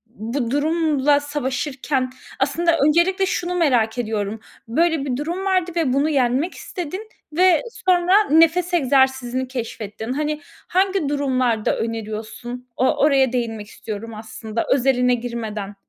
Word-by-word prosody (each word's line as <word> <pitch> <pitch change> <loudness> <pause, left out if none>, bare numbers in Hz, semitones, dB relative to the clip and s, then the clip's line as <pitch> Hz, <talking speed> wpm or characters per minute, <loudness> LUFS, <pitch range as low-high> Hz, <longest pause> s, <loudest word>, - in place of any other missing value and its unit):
bu 230 +3 -3
durumla 295 -1 +2
savaşırken? 270 -2 -2 0.3
Aslında 330 +5 +2
öncelikle 370 +5 +3
şunu 360 -1 -2
merak 245 -9 +2
ediyorum, 220 -2 -2 0.3
böyle 320 +3 +1
bir 250 -2 -2
durum 345 +6 -3
vardı 370 -2 +1
ve 310 -7 +1
bunu 285 +3 +2
yenmek 270 +4 +1
istedin 370 +5 -6 0.2
ve 360 0 +4 0.3
sonra 365 +3 +5
nefes 330 +3 +4
egzersizini 265 -3 +2
keşfettin. 225 -2 -5
Hani, 300 +1 -2 0.3
hangi 380 -5 +1
durumlarda 255 -6 +1
öneriyorsun? 225 +2 -5
O 260 - +2
oraya 270 -4 +4
değinmek 225 -4 -2
istiyorum 225 +1 -7
aslında, 220 +1 -5
özeline 250 -2 +3
girmeden. 220 -4 -5
270 Hz, 120 wpm, -21 LUFS, 235-325 Hz, 0.3 s, sonra